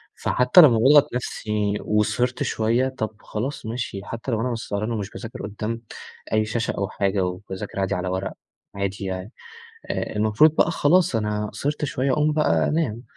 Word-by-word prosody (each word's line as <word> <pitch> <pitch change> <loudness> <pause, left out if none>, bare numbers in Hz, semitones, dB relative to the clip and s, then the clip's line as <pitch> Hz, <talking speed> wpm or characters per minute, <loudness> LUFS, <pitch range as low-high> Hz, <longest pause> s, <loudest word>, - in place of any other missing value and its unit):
فحتى 125 +8 +5
لمّا 125 -7 +7
باضغط 140 +3 +5
نفسي 105 -4 -2
وسهرت 105 +4 0
شوية، 115 +4 +1
طب 110 -4 -4
خلاص 125 +6 -4
ماشي 110 -3 -4
حتى 115 +4 -5
لو 115 - 0
أنا 125 +1 -1
مش 115 -1 -5
سهران 105 +3 -2
ومش 105 -3 -3
باذاكر 115 -1 -8
قدّام 110 +2 -4 0.5
أي 110 0 +3
شاشة 115 +1 -1
أو 100 +1 -1
حاجة 100 -1 0
وباذاكر 95 +2 -6
عادي 95 - 0
على 90 +1 -3
ورق 95 +1 -3 0.4
عادي 100 0 -3
يعني، 95 +4 -5 0.6
آآ - - -3
المفروض 110 +9 +4
بقى - - +4
خلاص 165 -3 +3
أنا 105 -1 -1
سهرت 145 +8 -2
شوية 135 -1 0
أقوم 150 +2 +2
بقى 85 - +2
أنام، 130 -8 -1
110 Hz, 170 wpm, -23 LUFS, 105-125 Hz, 0.6 s, لمّا